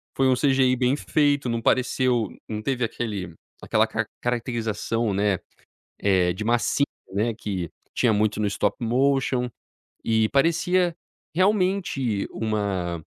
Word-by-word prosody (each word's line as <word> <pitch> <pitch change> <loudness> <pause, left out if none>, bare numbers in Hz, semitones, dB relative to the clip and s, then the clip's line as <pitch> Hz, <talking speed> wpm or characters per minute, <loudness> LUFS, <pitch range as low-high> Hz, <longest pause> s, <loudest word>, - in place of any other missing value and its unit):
Foi 135 -1 +3
um 130 - +4
CGI 130 -1 +3
bem 125 +2 +2
feito, 145 -4 +1
não 115 0 0
pareceu 125 -2 +2 0.2
não 105 -1 -4
teve 125 +1 -1
aquele 100 -7 -4 0.3
aquela - - +2
car - - -2 0.2
caracterização, 115 -2 -1
né, 100 -1 +1 0.6
eh 95 -3 +3
de 105 - -5
massinha, 120 +4 +1 0.3
né, 110 +3 +1
que 95 -6 -4 0.2
tinha 120 -3 +3
muito 105 0 +1
no 105 - +1
stop 100 0 0
motion 130 0 +1 0.6
e 110 -1 +2
parecia 170 +4 +2 0.4
realmente 180 - +1
uma 100 -6 -2
120 Hz, 130 wpm, -24 LUFS, 105-135 Hz, 0.6 s, um